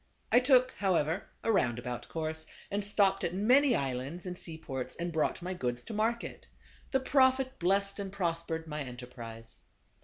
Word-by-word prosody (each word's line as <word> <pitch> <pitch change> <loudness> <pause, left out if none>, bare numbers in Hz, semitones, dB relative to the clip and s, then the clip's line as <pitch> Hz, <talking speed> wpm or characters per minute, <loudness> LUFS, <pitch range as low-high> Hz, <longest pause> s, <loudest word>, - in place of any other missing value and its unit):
I 245 - +8
took, 255 -1 +5
however, 180 -2 +1 0.2
a 225 - +2
roundabout 120 - 0
course, 160 -1 -3 0.2
and 200 +1 0
stopped 200 -1 +3
at 175 - -1
many 250 +6 +5
islands, 135 +5 -2
and 180 -1 -4
seaports, 135 -7 -5
and 170 0 -3
brought 160 +2 0
my 185 +1 -2
goods 125 -7 -2
to 225 - -7
market. 225 +2 -1 0.4
The 265 - +2
Prophet 260 0 +3
blessed 195 +3 +1
and 195 -1 -4
prospered 165 -4 -2
my 150 -1 -4
enterprise. 120 -3 -7
175 Hz, 155 wpm, -31 LUFS, 140-210 Hz, 0.4 s, I